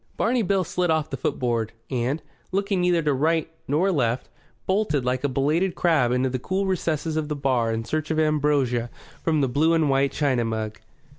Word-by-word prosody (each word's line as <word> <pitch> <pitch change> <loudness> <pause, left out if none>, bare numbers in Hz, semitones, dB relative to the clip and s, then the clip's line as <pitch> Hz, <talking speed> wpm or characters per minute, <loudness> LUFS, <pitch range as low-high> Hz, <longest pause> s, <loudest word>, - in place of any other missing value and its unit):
Barney 240 +1 +2
Bill 195 -2 +1
slid 180 0 -1
off 160 -1 +1
the - - -1
footboard, 120 -4 -1 0.2
and, 130 +4 -1 0.3
looking 195 0 0
neither 175 -2 +2
to 150 -1 +2
right 160 +3 +1 0.2
nor 165 +8 +2
left, 125 -6 0 0.4
bolted 190 - +1
like 125 +1 0
a 145 - +1
belated 155 +7 +1
crab 155 -9 +2
into 125 +1 +2
the 130 0 -2
cool 190 +9 -1
recesses 160 -4 -1
of 155 -1 -1
the 150 - -1
bar 130 -5 +1
in 115 0 -2
search 155 +4 -2
of 160 - 0
ambrosia 145 -6 +1 0.3
from 155 -2 +1
the 135 - +2
blue 155 +6 +2
and 155 -4 +2
white 135 0 +2
china 135 -5 +1
mug. 110 -1 -3
150 Hz, 195 wpm, -24 LUFS, 125-165 Hz, 0.4 s, Barney